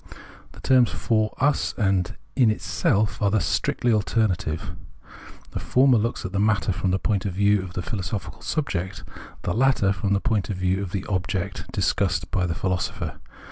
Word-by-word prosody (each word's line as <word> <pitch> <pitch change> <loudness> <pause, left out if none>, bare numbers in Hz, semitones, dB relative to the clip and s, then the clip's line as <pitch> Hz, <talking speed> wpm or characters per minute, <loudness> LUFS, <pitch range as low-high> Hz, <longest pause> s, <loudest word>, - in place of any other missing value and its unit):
The - - -14
terms 125 -3 +4
"for 110 -1 0
us" 145 +3 +1
and 95 -5 +1 0.2
"in 125 -5 +5
itself" 110 0 0
are 100 - +3
thus 100 -6 +1
strictly 120 +10 +1
alternative: 100 -7 0 0.8
the - - -4
former 130 -2 +4
looks 115 +3 -2
at 95 - -4
the 100 - -1
matter 105 -1 +2
from 95 +1 -1
the 95 - +2
point 100 0 0
of 95 - -3
view 100 +1 +3
of 90 -1 -8
the 90 - -3
philosojjhical 100 0 -4
subject, 95 - -2 0.4
the 90 - -1
latter 120 -5 +3
from 100 +2 -1
the 100 - +3
point 105 -5 0
of 100 - -2
view 95 +1 0
of 95 -3 -5
the 95 -1 -3
object 95 0 -3
discussed 85 -4 0
by 90 -2 +1
tlie 85 - -2
philosopher. 95 0 -2
100 Hz, 180 wpm, -24 LUFS, 95-110 Hz, 0.8 s, in